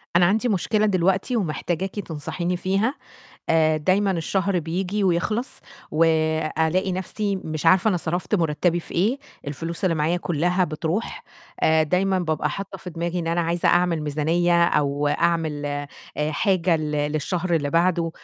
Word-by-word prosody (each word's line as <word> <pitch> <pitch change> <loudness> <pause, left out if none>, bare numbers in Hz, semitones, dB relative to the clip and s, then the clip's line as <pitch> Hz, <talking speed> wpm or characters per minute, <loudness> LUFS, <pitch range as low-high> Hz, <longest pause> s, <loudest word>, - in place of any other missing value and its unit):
أنا 175 0 +6
عندي 220 +7 +2
مشكلة 210 +2 +1
دلوقتي 190 +4 +1
ومحتاجاكِ 190 0 -2
تنصحيني 170 +1 -3
فيها. 195 +9 0 0.5
آآ 155 -1 +3
دايمًا 190 +6 +2
الشهر 190 +2 0
بييجي 180 +5 -2
ويخلّص 205 +8 -1 0.3
وألاقي 160 +3 +1
نَفْسي 195 +2 -2
مش 155 -3 -4
عارفة 185 +5 +5
أنا 195 - +2
صرفت 175 +4 -2
مُرتّبي 170 0 +1
في - - -12
إيه، 215 +10 +1 0.3
الفلوس 165 +5 -4
اللي 180 -3 +2
معايا 160 +3 +1
كُلّها 175 +2 +1
بتروح. 165 +6 -3 0.4
آآ 160 0 +4
دايمًا 185 +4 +1
بابقى 160 -3 -1
حاطّة 195 0 -6
في 180 - -8
دماغي 170 +1 -3
إن 170 - -3
أنا 170 +1 +1
عايزة 170 +1 0
أعمل 175 -3 +2
ميزانية، 170 +4 +2
أو 145 -3 +1
أعمل 160 -2 0
آآ 145 0 -3 0.4
حاجة 180 0 +2
ل 155 -1 -3 0.2
للشهر 170 +3 -1
اللي 145 -3 0
بعده، 170 0 +2
175 Hz, 150 wpm, -23 LUFS, 160-190 Hz, 0.5 s, أنا